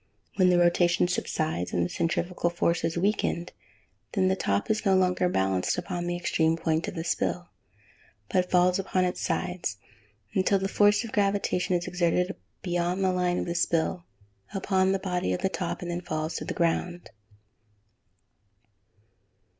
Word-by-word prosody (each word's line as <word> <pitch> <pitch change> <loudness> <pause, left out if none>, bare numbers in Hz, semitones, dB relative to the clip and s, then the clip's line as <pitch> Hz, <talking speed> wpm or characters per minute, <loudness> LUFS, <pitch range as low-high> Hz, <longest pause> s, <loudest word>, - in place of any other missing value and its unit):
When 185 -2 +5
the 180 - +4
rotation 175 0 +3
subsides, 155 - -2
and 85 -1 +1
the - - -4
centrifugal 175 +1 -1
force 170 0 0
is 165 - -1
weakened, 180 -2 0 0.6
then 185 -3 +2
the 190 - +2
top 100 - 0
is 220 - 0
no 195 -3 +4
longer 180 -1 +2
balanced 95 - 0
upon 175 0 -3
the 175 - -1
extreme 165 -2 +1
point 160 +2 0
of 205 - -5
the 165 - -3
spill, 175 +1 -1 0.8
but 180 - +1
falls 180 +1 +3
upon 185 -1 0
its 180 - -2
sides, 180 - -2 0.6
until 190 +1 +3
the 195 0 -1
force 205 +3 +3
of 230 - -7
gravitation 200 -3 +1
is 175 0 -1
exerted 180 +1 0 0.3
beyond 175 +1 0
the 185 -1 +2
line 180 -1 +1
of - - -1
the 170 - -2
spill, 170 0 0 0.5
upon 190 -1 +2
the 195 - +2
body 180 - -1
of - - -3
the 190 - +2
top, 190 - -4
and 175 - -4
then 170 - -2
it 180 - -15
falls 155 +1 -2
to - - -5
the - - -4
ground. 175 +1 -1
180 Hz, 170 wpm, -27 LUFS, 170-185 Hz, 0.8 s, When